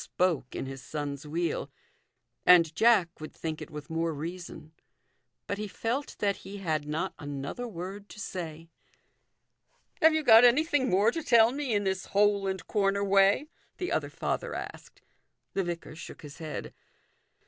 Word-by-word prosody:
305 175 -7 +2
spoke - - -13
in - - -3
his 135 0 -7
son's 145 +1 -5
wheel; 165 +2 -2 0.7
and 170 -3 +6
Jack 195 -5 +4
would 155 - -7
think 160 -1 -5
it - - -7
with 150 0 -9
more 165 +1 0
reason. 160 0 -7 0.7
But 200 - -3
he 210 - -3
felt 240 +7 -3
that 200 -1 0
he 195 +2 -9
had 155 -6 -2
not 160 +5 -2
another 145 - -5
word 195 +1 -7
to - - -11
say. 165 -4 -6 0.6
" - - -40
Have 320 0 +6
you 315 - +1
got 225 -3 +8
anything 285 +2 +4
more 200 +5 +4
to 330 - -3
tell 235 -5 +5
me 270 -4 -2
in 205 - +1
this 190 -1 -2
hole 200 -1 +2
and 190 -1 -3
corner 200 -1 +1
way? 195 +6 +4 0.2
" - - -38
the 360 0 -3
other - - 0
father - - -3
asked. - - -8 0.5
The 195 - 0
vicar 170 -3 -5
shook 160 - -10
his 145 -1 -10
head. 155 -2 -6
190 Hz, 170 wpm, -29 LUFS, 160-215 Hz, 0.7 s, got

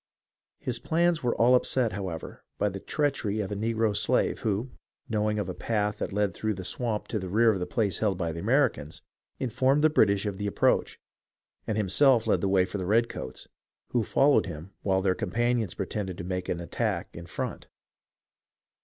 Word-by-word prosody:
His 120 -2 -3
plans 170 +2 +1
were 120 -2 0
all 120 +2 +4
upset, 125 -2 +2
however, 90 -4 -6
by 105 - +1
the 95 0 -6
treachery 135 -6 -1
of 105 -1 -3
a - - -2
negro 110 0 0
slave, - - +1
who, 110 +4 -1 0.4
knowing 105 -1 0
of 105 -4 -2
a 90 - -3
path 105 -1 -1
that - - -3
led 100 -2 0
through 110 +3 -2
the 95 0 -7
swamp 115 -1 -2
to 110 - -1
the 95 -1 -5
rear 110 +4 +4
of 95 - -3
the 90 - -3
place 105 -5 0
held 100 -4 +1
by 85 -3 -1
the 80 - -6
Americans, 115 - 0 0.3
informed 130 +4 +1
the 155 - +5
British 100 -8 +3
of 100 -1 -3
the 105 - -2
approach, 100 - +1 0.7
and 110 - -1
himself 115 +4 +4
led - - +2
the 100 - +1
way 95 -1 +4
for 100 - -5
the 90 - -3
redcoats, 115 +3 -1 0.4
who 120 - +1
followed 140 0 +3
him 85 +2 -8
while 95 -1 +1
their 95 -1 +3
companions 120 -2 -1
pretended 95 -2 -4
to - - -5
make 90 0 -3
an 85 - -1
attack 85 -3 -2
in 85 0 -8
front. - - -5
105 Hz, 190 wpm, -28 LUFS, 95-120 Hz, 0.7 s, the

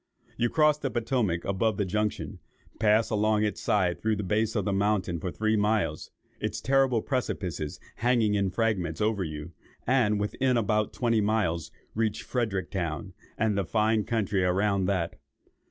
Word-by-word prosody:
You 120 0 +1
cross 150 +1 +3
the 140 - -2
Potomac 115 -7 0
above 100 +2 0
the 100 - +1
junction, 105 +3 -2 0.4
pass 110 0 +3
along 105 0 +2
its 105 - -2
side 90 -4 +1
through 110 0 +1
the 105 - -3
base 110 +4 0
of 105 -4 0
the 100 - 0
mountain 95 -4 0
for 90 - -3
three 110 +3 0
miles, 105 -7 0 0.3
its - - -2
terrible 130 -2 +2
precipices 90 - -3 0.2
hanging 115 -3 +2
in 100 -2 +1
fragments 95 -5 -1
over 105 -2 +1
you, 75 0 -6 0.3
and, 115 -5 +2
within 125 +5 +1
about 105 -1 +1
twenty 115 -3 +1
miles, 100 -6 0 0.2
reach 110 -1 -1
Fredericktown, 95 -5 -2 0.2
and 110 -1 +1
the 100 - +1
fine 110 +3 +1
country 100 -4 0
round 95 +1 +1
that. 90 -2 -1
105 Hz, 155 wpm, -28 LUFS, 95-110 Hz, 0.4 s, cross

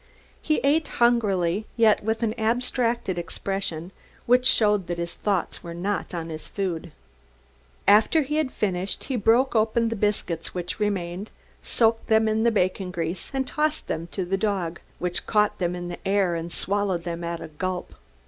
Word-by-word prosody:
He 310 - +1
ate 300 +3 +3
hungrily, 210 -5 +2
yet 220 -3 +4
with 220 +2 -1
an 220 -1 +1
abstracted 235 -3 0
expression, 175 -1 -4 0.3
which 250 +1 +4
showed 210 -4 +4
that 175 - -2
his 170 0 -3
thoughts 200 -4 -1
were 170 0 -7
not 190 +1 -2
on 165 -1 -4
his 155 -1 -7
food. 175 -4 -3 1.0
After 220 +10 +5
he 300 +3 -2
had 305 -4 0
finished 190 -2 -2
he 265 - -3
broke 240 +4 +3
open 225 +1 +2
the 230 - -2
biscuits 195 -6 -1
which 175 +2 -4
remained, 195 -1 -2 0.3
soaked 225 -1 +1
them 220 0 +4
in 220 0 +1
the 235 - +4
bacon 185 -2 0
grease 170 0 -3
and 270 -1 -1
tossed 305 +2 -1
them 165 +1 -3
to 185 +1 -3
the 195 +2 0
dog, 190 -6 -1 0.2
which 180 0 -2
caught 210 -1 +2
them 175 -1 0
in 175 0 -5
the 175 - -6
air 195 -2 +2
and 165 0 -4
swallowed 195 -3 0
them 170 -1 -4
at 170 0 -3
a 165 - -8
gulp. 180 +4 -4
200 Hz, 175 wpm, -25 LUFS, 175-225 Hz, 1.0 s, After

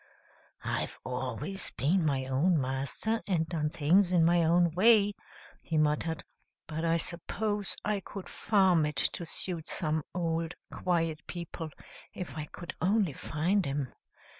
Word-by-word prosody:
"I've - - -2
always 130 - -3
been 170 +7 +2
my 135 -4 +1
own 150 +6 +2
master, 135 - -1
and 165 -5 +1
done 155 -3 -1
things 175 +6 +3
in 170 -3 +5
my 170 0 +4
own 170 +1 +4
way," 205 +3 +5 0.5
he 160 - -1
muttered, 155 +2 +1 0.4
"but 160 +1 -4
I 165 0 +3
suppose 205 +5 -2
I 210 -1 +1
could 195 0 -8
farm 190 -6 +3
it 150 - -4
to 170 +5 0
suit 170 -1 -1
some 155 -1 0
old, 165 -1 -1 0.2
quiet 165 -3 0
people, 170 -2 -5 0.5
if 160 -8 -6
I 155 -1 -3
could 170 +3 -8
only 195 -2 +2
find 175 +7 0
'em. 140 -1 -2
165 Hz, 140 wpm, -30 LUFS, 150-185 Hz, 0.5 s, in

